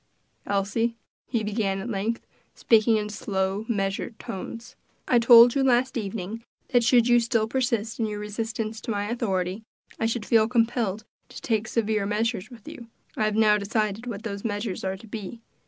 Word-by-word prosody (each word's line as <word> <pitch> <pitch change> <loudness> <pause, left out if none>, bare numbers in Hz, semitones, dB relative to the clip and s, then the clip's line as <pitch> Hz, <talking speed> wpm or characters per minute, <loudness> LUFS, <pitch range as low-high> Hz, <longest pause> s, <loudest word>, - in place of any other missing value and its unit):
"Elsie," 210 +4 0 0.3
he 230 -3 -1
began 205 -2 -1
at 195 +4 -5
length, 225 +1 -2 0.3
speaking 225 0 +4
in 210 -1 -2
slow, 195 0 -2
measured 200 +1 -2
tones, 230 +5 -7 0.3
"I 245 - +4
told 235 0 +8
you 275 - +1
last 255 0 +2
evening 215 0 -4 0.3
that 245 -3 +3
should 240 0 +4
you 240 0 +6
still 230 -2 +1
persist 235 -3 -1
in 225 - +1
your 210 -1 -4
resistance 220 +1 -4
to - - -8
my 205 0 -2
authority, 190 -4 -1 0.4
I 225 - +1
should 225 -2 -2
feel 220 -2 +4
compelled 225 -3 0 0.2
to - - -9
take 225 -1 -1
severe 215 -3 0
measures 215 -1 -1
with 235 -5 -14
you. 235 - -9 0.3
I 215 - +1
have 215 -1 0
now 215 -1 +4
decided 215 +2 -2
what 215 -3 -5
those 200 -3 -5
measures 205 -3 -3
are 190 0 -2
to 210 - -14
be. 215 0 -7
220 Hz, 175 wpm, -25 LUFS, 205-235 Hz, 0.4 s, told